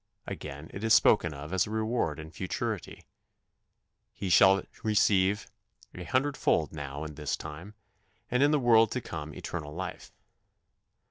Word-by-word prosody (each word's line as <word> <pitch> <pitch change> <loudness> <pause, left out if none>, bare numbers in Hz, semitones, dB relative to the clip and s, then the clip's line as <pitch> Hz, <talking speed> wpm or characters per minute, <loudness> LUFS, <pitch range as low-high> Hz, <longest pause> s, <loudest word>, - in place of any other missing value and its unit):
" - - -50
Again 75 +1 -7
it 100 - -6
is 110 -1 +5
spoken 85 -6 +4
of 75 +3 -8
as 95 +1 +2
a - - -7
reward 110 -7 -1
in 80 0 -9
futurity: 95 +2 -4 1.1
"He 95 - -5
shall 95 +2 +6 0.2
receive 105 -2 +3 0.5
an 90 - -7
hundredfold 130 - +1
now 70 -1 -6
in 75 -1 -6
this 75 0 -3
time... 80 +7 -9 0.6
and 125 +2 +2
in 145 - +5
the 150 - +3
world 115 -4 +5
to 125 - -2
come 75 -6 -6
eternal 75 -3 -6
life." 95 +2 -6
95 Hz, 150 wpm, -29 LUFS, 75-110 Hz, 1.1 s, shall